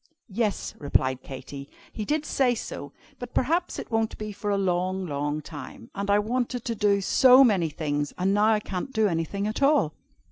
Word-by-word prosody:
"Yes," 215 -1 -1
replied 130 -3 +1
Katy, 140 +1 -9 0.2
"he 215 - -4
did 305 +3 -1
say 255 -4 +2
so. - - -6 0.3
But 245 -1 -8
perhaps 335 +7 +1
it - - -7
won't 225 -1 0
be 215 0 -5
for 205 +1 -5
a 200 - +2
long, 185 0 0
long 145 -1 -2
time. 140 -7 -10
And 200 0 -4
I 200 - +5
wanted 240 +3 -1
to 235 - -1
do 200 -2 +2
so 255 +6 +7
many 195 -9 +3
things. 145 -1 -2
And 190 +2 +1
now 205 +1 +3
I 215 -1 +2
can't 190 +6 -5
do 220 -2 +3
anything 175 +3 -2
at 215 +5 -3
all!" 275 - +3
200 Hz, 190 wpm, -26 LUFS, 165-235 Hz, 0.3 s, so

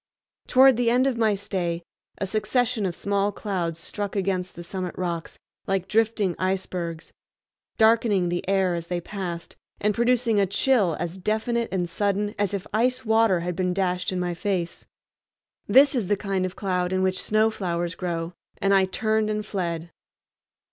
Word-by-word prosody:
Toward 260 -1 +6
the 240 -1 +2
end 250 +2 +3
of 270 -2 +1
my 220 -3 +2
stay 180 -4 -3 0.3
a 195 - -2
succession 220 +2 0
of 175 - -4
small 200 +1 0
clouds 180 -6 -3
struck 200 +4 -5
against 185 -2 -1
the 175 - -8
summit 185 0 -5
rocks 170 -2 -3 0.3
like 195 -1 0
drifting 215 -4 +1
icebergs, 180 -3 -3 0.6
darkening 220 -4 +4
the 175 0 -2
air 190 -2 +2
as 170 -1 -4
they 175 0 -1
passed, 175 -2 -6 0.2
and 210 +1 +1
producing 235 -1 +2
a 195 - +3
chill 200 - +2
as 175 +2 -4
definite 220 +4 0
and 180 -2 -1
sudden 205 +4 -1
as 205 -2 +1
if 200 -2 -3
ice 250 +3 +1
water 220 -5 +3
had 175 0 -3
been 180 0 0
dashed 180 -1 0
in 185 - -2
my 175 -1 -1
face. 175 -1 -3 0.8
This 270 +7 +6
is 235 -8 -1
the 205 - +2
kind 195 -2 -1
of 185 - -10
cloud 180 -2 -1
in 185 0 +1
which 185 0 0
snow 215 +1 +2
flowers 175 -4 -2
grow, 170 -1 -3 0.2
and 195 0 +2
I 195 -1 +5
turned 215 +3 0
and 210 0 -2
fled. 170 -5 -3
195 Hz, 170 wpm, -25 LUFS, 180-215 Hz, 0.8 s, Toward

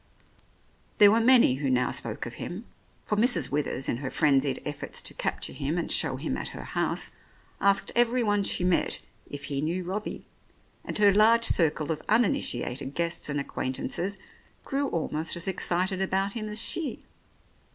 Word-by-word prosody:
There 205 -1 +8
were 225 - +4
many 230 - +5
who 140 -1 -1
now 125 -1 +2
spoke 110 -2 -3
of 120 - -7
him, 190 +7 -6 0.4
for 210 - 0
Mrs. 195 - +3
Withers 140 -2 -2
in - - 0
her 135 0 -4
frenzied 140 -3 +2
efforts 145 -1 -3
to - - -7
capture - - -2
him 145 +5 -2
and 170 - -2
show 140 -5 +3
him 130 - -3
at - - -4
her - - -7
house, - - -1 0.5
asked 200 0 +2
everyone 235 -3 +3
she 185 - -1
met 180 -1 +1 0.3
if 145 0 -7
he 140 -1 -3
knew 170 +4 -2
Robbie, 195 +5 -5 0.6
and - - -3
her 205 -1 +6
large 225 +3 +5
circle 155 -5 +2
of 155 - -3
uninitiated 140 - 0
guests 170 -2 -1
and 145 0 -1
acquaintances 155 +8 -2 0.5
grew 280 0 -1
almost 160 -1 -2
as 170 +1 -2
excited 185 0 0
about 195 +1 0
him 215 -2 -4
as 210 +1 -3
she. 310 +6 -4
175 Hz, 165 wpm, -27 LUFS, 145-210 Hz, 0.6 s, There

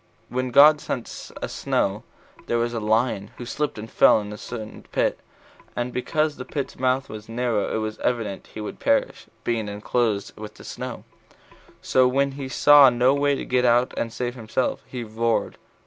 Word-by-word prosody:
When 130 0 -2
God 150 +4 +7
sent 120 - -5
a - - -1
snow, - - -1 0.5
there 120 - +1
was 120 0 0
a 115 - -2
lion 110 -1 0
who 120 - -7
slipped 150 +3 -2
and 105 +1 -6
fell - - +5
into 105 0 -6
a - - -8
certain 110 -3 -7
pit, - - 0 0.6
and 120 +1 -3
because 150 +4 0
the 125 - -5
pit's 140 +1 -5
mouth 130 +1 +1
was 110 0 -9
narrow 115 -2 -1
it - - 0
was 110 0 -4
evident 110 -6 -2
he 110 - -5
would 105 - -7
perish, - - 0 0.2
being 115 -3 -1
enclosed 105 0 -1
with 105 0 -9
the - - -13
snow; - - -6 0.8
so 130 -1 +4
when 140 +2 +1
he 135 -1 -6
saw 145 +2 +7
no 125 +2 +3
way 140 0 +2
to - - -5
get 125 0 +1
out 120 +1 +3
and 115 - -2
save 120 +1 -3
himself, 120 +1 -2
he 125 -2 -5
roared. 115 +1 -1
120 Hz, 185 wpm, -24 LUFS, 110-130 Hz, 0.8 s, God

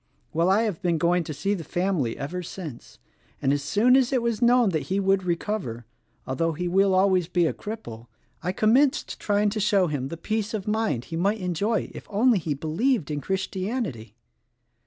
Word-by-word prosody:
Well, 170 +3 +2
I 205 +4 +4
have 210 -7 -2
been 170 -2 +1
going 170 +2 +2
to - - -5
see 195 +7 -1
the 180 -5 -4
family 175 -7 -1
ever 170 +6 -4
since, 165 -7 -9 0.4
and 135 - +2
as 145 - 0
soon 210 - +3
as 265 -1 +3
it 255 -3 +1
was 235 -1 -1
known 240 -2 +5
that 160 -5 -2
he 190 +1 +1
would 195 -1 +2
recover 170 - -2 0.2
— - - -42
although 165 +5 -1
he 180 +3 -3
will 190 +2 +3
always 185 -2 +3
be 175 -1 +2
a - - 0
cripple 120 - -8 0.2
— - - -41
I 180 - -1
commenced 255 +9 +2
trying 205 0 +1
to 215 - -2
show 200 -2 +3
him 145 -5 -2
the 165 - -6
peace 215 +4 -2
of 200 -2 -5
mind 215 - 0
he - - -1
might 200 +6 +1
enjoy 200 +4 -1
if - - -10
only 220 +1 +3
he 155 -3 -2
believed 165 - 0
in 145 -1 -2
Christianity. 190 - -3
190 Hz, 200 wpm, -25 LUFS, 160-215 Hz, 0.4 s, known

